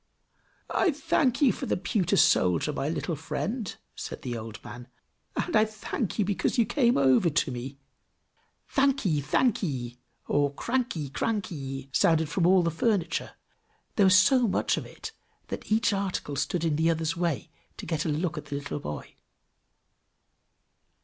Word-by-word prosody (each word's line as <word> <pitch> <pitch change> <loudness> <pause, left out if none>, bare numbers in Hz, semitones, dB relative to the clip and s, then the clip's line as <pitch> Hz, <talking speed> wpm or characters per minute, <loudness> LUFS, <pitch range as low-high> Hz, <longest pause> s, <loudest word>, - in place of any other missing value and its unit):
"I 375 - +3
thank 290 -2 +1
you 265 - +5
for - - -5
the - - +1
pewter 180 0 0
soldier, 90 - +3
my 140 0 -2
little 165 +1 -2
friend!" 200 - -4 0.2
said - - -7
the 125 -3 -3
old 110 -1 -6
man. 120 0 -9 0.5
"And 350 - -1
I 215 - +6
thank 215 -1 -4
you 210 - +2
because 205 +6 0
you 235 - +4
come 240 +1 +2
over 135 +5 +4
to 155 -2 +1
me." 130 +3 -6 0.9
"Thankee! 265 - +2
thankee!" 140 - 0 0.3
or 145 -1 +2
"cranky! 235 - -2
cranky!" 140 -8 -3
sounded 160 0 +3
from 170 +2 +2
all 185 -1 +5
the 170 - +1
furniture; 170 -1 -1 0.6
there 200 -3 +5
was 185 0 +7
so 245 +6 +5
much 195 - +1
of - - -5
it, - - -8 0.4
that - - -6
each 220 0 +3
article 190 -7 -2
stood 165 +4 -1
in 155 -3 +1
the 160 +1 +3
other's 160 0 0
way, 170 -8 -2 0.3
to - - -7
get 160 -2 -1
a - - -2
look 160 +2 -1
at 150 - -11
the 145 -1 -5
little 140 +1 -4
boy. 75 - -7
165 Hz, 160 wpm, -27 LUFS, 145-210 Hz, 0.9 s, was